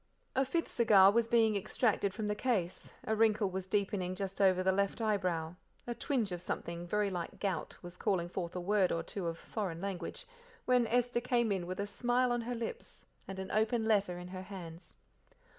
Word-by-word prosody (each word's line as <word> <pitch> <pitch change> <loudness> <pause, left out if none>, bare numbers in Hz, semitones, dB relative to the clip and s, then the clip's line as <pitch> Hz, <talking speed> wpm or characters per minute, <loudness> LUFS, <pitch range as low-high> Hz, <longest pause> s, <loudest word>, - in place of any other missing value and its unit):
A 265 - +4
fifth 330 +5 -1
cigar 205 -5 +6
was 230 +1 +2
being 225 -2 +4
extracted 200 0 +1
from 215 +2 -4
the 210 - 0
case, 210 -6 -1
a 220 - +1
wrinkle 215 -2 +3
was 190 0 -4
deepening 190 -2 0
just 195 0 -4
over 185 -1 +4
the 190 - +4
left 200 +3 0
eyebrow, 180 -6 0 0.3
a 240 - -2
twinge 235 -5 -1
of 175 -1 -4
something 170 -1 -4
very 205 +1 +1
like 175 -2 -5
gout 190 -5 -2
was 175 0 -9
calling 185 -5 0
forth 175 0 -4
a - - -1
word 190 0 +2
or 165 - -1
two 185 -1 -4
of 165 0 -3
"foreign 185 -6 -4
language," 195 - -4 0.4
when 250 -2 +4
Esther 245 +1 +1
came 240 -3 +1
in 185 -3 -1
with 185 +1 -4
a 200 - 0
smile 245 +4 +1
on 240 0 +1
her 245 +1 -3
lips 235 - -6 0.2
and 195 - -6
an 190 0 -5
open 220 +1 +1
letter 200 -5 +2
in 180 0 -8
her 185 0 -6
hands. 180 -3 -9
200 Hz, 200 wpm, -33 LUFS, 185-225 Hz, 0.4 s, cigar